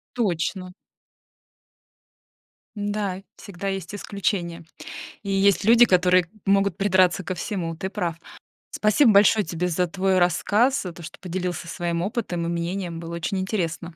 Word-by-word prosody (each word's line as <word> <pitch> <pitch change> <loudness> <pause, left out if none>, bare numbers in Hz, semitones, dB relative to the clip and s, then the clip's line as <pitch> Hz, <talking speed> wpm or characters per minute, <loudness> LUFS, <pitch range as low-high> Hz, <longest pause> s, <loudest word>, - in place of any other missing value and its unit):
Точно. 185 -4 -1 2.0
Да, 205 -2 -3
всегда 195 0 -6
есть 195 0 -4
исключения 180 -4 -3 0.6
и 200 - -5
есть 195 0 +3
люди, 235 +3 +7
которые 180 -1 +4 0.2
могут 195 -2 +2
придраться 190 -1 +3
ко 185 - -4
всему, 175 -3 -3
ты 190 - -4
прав! 170 -4 -3 0.5
Спасибо 215 +3 +3
большое 210 +1 +5
тебе 170 +2 -2
за 180 +1 0
твой 190 +1 +1
рассказ, 210 - +2
за 180 -2 -6
то, 175 - -12
что 155 - -10
поделился 180 -2 -4
своим 170 0 -2
опытом 185 -5 -2
и - - -2
мнением, 170 0 -3
было 170 0 -6
очень 170 +3 -2
интересно! 175 -3 -3
185 Hz, 140 wpm, -24 LUFS, 170-200 Hz, 2.0 s, люди